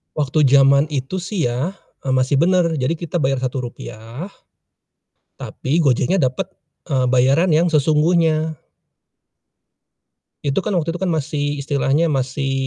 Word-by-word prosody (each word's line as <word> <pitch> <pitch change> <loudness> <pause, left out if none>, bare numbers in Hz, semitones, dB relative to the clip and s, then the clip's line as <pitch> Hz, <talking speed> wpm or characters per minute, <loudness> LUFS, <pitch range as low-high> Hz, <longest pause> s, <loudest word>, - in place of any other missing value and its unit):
Waktu 150 0 +1
jaman 140 +1 +5
itu 135 +7 -3
sih 180 - -2
ya, 140 +11 -2 0.3
eee, 130 - +1
masih 130 +2 +2
bener, 170 -1 +2
jadi 130 +5 0
kita 170 +1 -4
bayar 135 -3 0
Rp.1 125 - -6 1.1
tapi 150 +6 -2
Gojeknya 140 +5 +2
dapet, 165 +9 -1 0.3
eee, 130 -5 0
bayaran 135 +8 +3
yang 165 +2 +2
sesungguhnya. 155 +1 +2 1.9
Itu 140 +6 0
kan 205 -1 -2
waktu 165 -1 -1
itu 175 - -7
kan 190 - -1
masih 145 -2 -2
istilahnya 145 +3 +1
masih 135 +1 -2
145 Hz, 130 wpm, -19 LUFS, 130-170 Hz, 1.9 s, jaman